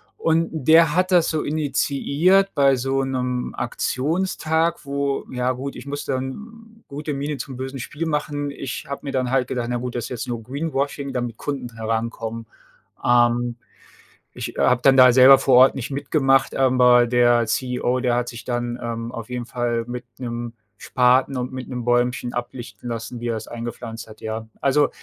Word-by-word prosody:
und 165 Hz, 0 st, +1 dB
der 160 Hz, +1 st, +4 dB
hat 185 Hz, +1 st, +2 dB
das 175 Hz, -3 st, +4 dB
so 155 Hz, -1 st, -1 dB
initiiert 155 Hz, +5 st, +1 dB
bei 135 Hz, -2 st, +4 dB
so 135 Hz, +2 st, 0 dB
'nem 125 Hz, -2 st, -2 dB
Aktionstag, 160 Hz, +5 st, -1 dB
wo 140 Hz, 0 st, -2 dB
ja 125 Hz, 0 st, 0 dB
gut, 135 Hz, +2 st, -5 dB
ich -, -, -9 dB
musste 145 Hz, -1 st, -4 dB
dann 220 Hz, -, -7 dB
gute 150 Hz, +2 st, -5 dB
Miene 145 Hz, +2 st, -3 dB
zum 130 Hz, -3 st, -7 dB
bösen 130 Hz, +1 st, -5 dB
Spiel 155 Hz, +6 st, -5 dB
machen. 145 Hz, -2 st, -2 dB
Ich 135 Hz, -3 st, -6 dB
habe 140 Hz, -, -5 dB
mir 140 Hz, -, -4 dB
dann 130 Hz, -2 st, -1 dB
halt 130 Hz, -2 st, +1 dB
gedacht: 120 Hz, -2 st, -2 dB
„Na 125 Hz, -, -1 dB
gut, 125 Hz, 0 st, -5 dB
das 120 Hz, -, -2 dB
ist -, -, -7 dB
jetzt 125 Hz, -3 st, -5 dB
nur 120 Hz, -1 st, -3 dB
Greenwashing, 140 Hz, +1 st, -3 dB
damit 120 Hz, -3 st, -3 dB
Kunden 130 Hz, -5 st, -5 dB
herankommen.” 115 Hz, 0 st, -3 dB, 0.6 s
Ähm, 120 Hz, 0 st, +3 dB, 0.8 s
ich -, -, -6 dB
habe 125 Hz, -1 st, +3 dB
dann 135 Hz, -1 st, +6 dB
da 125 Hz, -1 st, +8 dB
selber 130 Hz, +1 st, +8 dB
vor 135 Hz, -1 st, +3 dB
Ort 130 Hz, +1 st, +7 dB
nicht 130 Hz, 0 st, -5 dB
mitgemacht, 135 Hz, -1 st, +1 dB
aber 125 Hz, -2 st, +5 dB
der 120 Hz, -1 st, +3 dB
CEO, 125 Hz, +2 st, 0 dB
der 125 Hz, -2 st, +1 dB
hat 120 Hz, 0 st, -1 dB
sich 115 Hz, -2 st, -9 dB
dann, 120 Hz, -1 st, -2 dB
ähm, 115 Hz, 0 st, -4 dB
auf 115 Hz, -1 st, -7 dB
jeden 125 Hz, -1 st, -4 dB
Fall 120 Hz, -1 st, -2 dB
mit 125 Hz, 0 st, -6 dB
'nem 120 Hz, -2 st, -5 dB, 0.2 s
Spaten 130 Hz, +2 st, +2 dB
und 125 Hz, 0 st, -3 dB
mit 130 Hz, -1 st, -6 dB
'nem 125 Hz, -2 st, -4 dB
Bäumchen 120 Hz, 0 st, +1 dB
ablichten 120 Hz, -2 st, -6 dB
lassen, 115 Hz, +1 st, -5 dB
wie 120 Hz, -, -3 dB
er 115 Hz, -, 0 dB
es -, -, -8 dB
eingepflanzt 115 Hz, -1 st, -7 dB
hat, 110 Hz, -1 st, -14 dB
ja. 110 Hz, 0 st, -5 dB
Also, 145 Hz, +1 st, +3 dB
130 Hz, 180 wpm, -22 LUFS, 120-140 Hz, 0.8 s, da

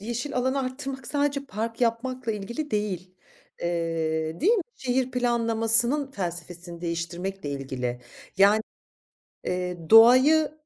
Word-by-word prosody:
yeşil 240 Hz, +6 st, -4 dB
alanı 260 Hz, +2 st, +1 dB
arttırmak 265 Hz, 0 st, -5 dB
sadece 285 Hz, -1 st, -1 dB
park 225 Hz, +2 st, -4 dB
yapmakla 240 Hz, 0 st, -1 dB
ilgili 235 Hz, +9 st, -5 dB
değil. 185 Hz, -4 st, -3 dB, 0.5 s
Eee, 165 Hz, -2 st, -2 dB
değil 395 Hz, -, +4 dB
mi? 415 Hz, -7 st, +2 dB
Şehir 260 Hz, -1 st, -1 dB
planlamasının 235 Hz, +2 st, +2 dB
felsefesini 175 Hz, -3 st, -6 dB
değiştirmekle 170 Hz, 0 st, -4 dB
ilgili. 130 Hz, -3 st, -4 dB, 0.4 s
Ya 200 Hz, +2 st, +6 dB, 0.9 s
eee, 180 Hz, 0 st, -3 dB
doğayı 255 Hz, +8 st, +7 dB
225 Hz, 105 wpm, -26 LUFS, 175-260 Hz, 0.9 s, doğayı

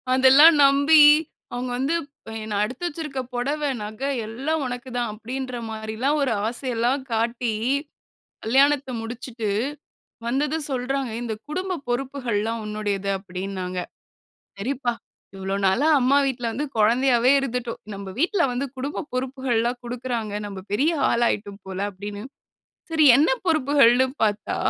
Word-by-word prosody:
அதெல்லாம் 265 Hz, +5 st, +8 dB
நம்பி 285 Hz, +3 st, +6 dB, 0.5 s
அவங்க 250 Hz, +1 st, -3 dB
வந்து 275 Hz, +6 st, 0 dB, 0.3 s
ப் -, -, -9 dB
என்ன, 215 Hz, -, -7 dB
"நான் 205 Hz, 0 st, +1 dB
எடுத்து 255 Hz, +10 st, -6 dB
வச்சுருக்க 295 Hz, -5 st, -4 dB
புடவை 285 Hz, +4 st, -1 dB
நகை 215 Hz, +6 st, -4 dB, 0.2 s
எல்லாம் 275 Hz, +8 st, -2 dB
உனக்கு 250 Hz, +1 st, -5 dB
தான்." 240 Hz, -2 st, -1 dB
அப்படீன்ற 255 Hz, +4 st, -5 dB
மாரில்லாம் 220 Hz, +6 st, -1 dB
ஒரு 270 Hz, -3 st, +1 dB, 0.2 s
ஆசையல்லாம் 245 Hz, +2 st, -1 dB
காட்டி 230 Hz, +1 st, 0 dB, 0.9 s
கல்யாணத்தை 275 Hz, +3 st, +3 dB
முடிச்சுட்டு, 230 Hz, -1 st, -5 dB, 0.8 s
வந்ததும் 290 Hz, +5 st, 0 dB
சொல்றாங்க. 265 Hz, +1 st, -1 dB
"ஏய் 235 Hz, -, -4 dB
இந்த 225 Hz, -2 st, -3 dB
குடும்ப 370 Hz, +3 st, -3 dB
பொறுப்புகள்லாம் 240 Hz, -4 st, -2 dB
உன்னுடையது." 205 Hz, -2 st, -2 dB
அப்படீன்னாங்க. 185 Hz, -1 st, -5 dB, 0.8 s
"சரிப்பா! 245 Hz, +3 st, -1 dB, 0.4 s
இவ்ளோ 195 Hz, 0 st, -3 dB
நாளா 215 Hz, +11 st, +2 dB
அம்மா 265 Hz, +3 st, +4 dB
வீட்ல 245 Hz, -3 st, -2 dB
வந்து 285 Hz, +7 st, -3 dB
கொழந்தையாவே 240 Hz, +3 st, +4 dB
இருந்துட்டோம். 250 Hz, -3 st, -3 dB
நம்ப 195 Hz, 0 st, -7 dB
வீட்ல 345 Hz, +4 st, +2 dB
வந்து 255 Hz, +3 st, -2 dB
குடும்ப 280 Hz, +5 st, -4 dB
பொறுப்புகள்லாம் 255 Hz, -2 st, -1 dB
குடுக்கிறாங்க. 240 Hz, -3 st, -4 dB
நம்ப 195 Hz, -2 st, -7 dB
பெரிய 285 Hz, +11 st, +2 dB, 0.2 s
ஆளாயிட்டோம் 210 Hz, -4 st, 0 dB
போல." 190 Hz, -1 st, -5 dB
அப்படீன்னு. 205 Hz, +2 st, -7 dB, 0.7 s
சரி 320 Hz, -1 st, +3 dB
என்ன 295 Hz, +4 st, +4 dB, 0.2 s
பொறுப்புகள்ன்னு 275 Hz, -5 st, +4 dB, 0.2 s
பார்த்தா, 210 Hz, -1 st, 0 dB
245 Hz, 125 wpm, -24 LUFS, 220-275 Hz, 0.9 s, அதெல்லாம்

